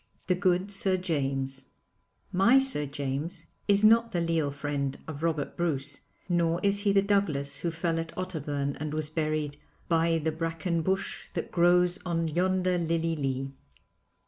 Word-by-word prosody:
THE 185 - +2
GOOD 185 +1 +1
SIR 195 -1 +1
JAMES 135 -6 -2 0.7
My 195 +8 +5
Sir 265 - +1
James 140 +3 -4 0.2
is 205 0 +4
not 230 +2 +6
the 175 - +1
leal 165 -3 +1
friend 140 -1 -3
of 155 -2 -6
Robert 160 -3 -1
Bruce 145 -5 -1 0.3
nor 170 -1 +2
is 200 0 +3
he 205 -1 +2
the 195 0 +4
Douglas 150 -9 0
who 170 - -1
fell 165 0 -1
at 165 0 -4
Otterburn 145 -6 -2
and 155 0 -3
was 155 -1 -3
buried 155 -2 -1 0.3
'by 165 0 +3
the 160 0 -1
bracken 165 +1 -2
bush 190 +4 -2
that - - -3
grows 180 +1 +4
on 165 -2 0
yonder 180 +2 +1
lilye 165 0 0
lee.' 135 -2 -2
165 Hz, 155 wpm, -28 LUFS, 145-185 Hz, 0.7 s, not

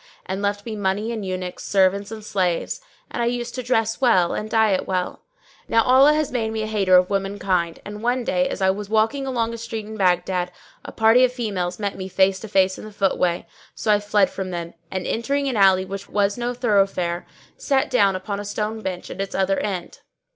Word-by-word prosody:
and 190 +1 -3
left 205 0 -1
me 225 -2 -4
money 205 +2 -1
and 220 -3 -4
eunuchs, 185 -1 -4
servants 195 +1 +2
and 215 -1 -8
slaves; 180 -5 -1 0.3
and - - -3
I 235 - +1
used 240 0 -2
to 255 - -3
dress 225 -1 0
well 185 -9 +4
and 215 - -4
diet 215 -4 +2
well. 185 -1 -2 0.5
Now 230 0 +3
Allah 270 +5 +6
had 305 -1 0
made 230 -3 -1
me 220 -1 -2
a - - -2
hater 200 -4 +4
of 180 +2 +2
women 195 0 -1
kind 175 -4 0
and 210 0 -7
one 245 +2 0
day, 270 +3 +1
as 200 - -3
I 190 - +5
was 200 +1 -6
walking 225 +6 +1
along 230 -3 -1
a 230 - -6
street 225 -1 -5
in 220 +1 -8
Baghdad, 180 -1 +1 0.3
a - - -8
party 225 +3 +5
of 255 - +4
females 195 -8 -3
met 200 -2 -3
me 190 -1 -5
face 190 0 +2
to 220 - -8
face 190 -2 +2
in - - -9
the 215 - -9
footway; 185 -3 0 0.3
so 215 - 0
I 205 - +4
fled 205 -1 +2
from 190 -1 -4
them 170 -1 -5 0.2
and, 185 0 -3
entering 280 +5 -1
an 260 - -1
alley 190 -2 +5
which 195 +1 -7
was 205 -1 +1
no 245 0 -3
thoroughfare, 195 -7 +1 0.3
sat 275 0 +1
down 200 -6 +4
upon 200 +2 -4
a - - -4
stone 215 +2 -3
bench 185 -3 -5
at 195 - -5
its 195 - -4
other 195 0 +1
end. 190 -4 -4
205 Hz, 220 wpm, -22 LUFS, 190-225 Hz, 0.5 s, Allah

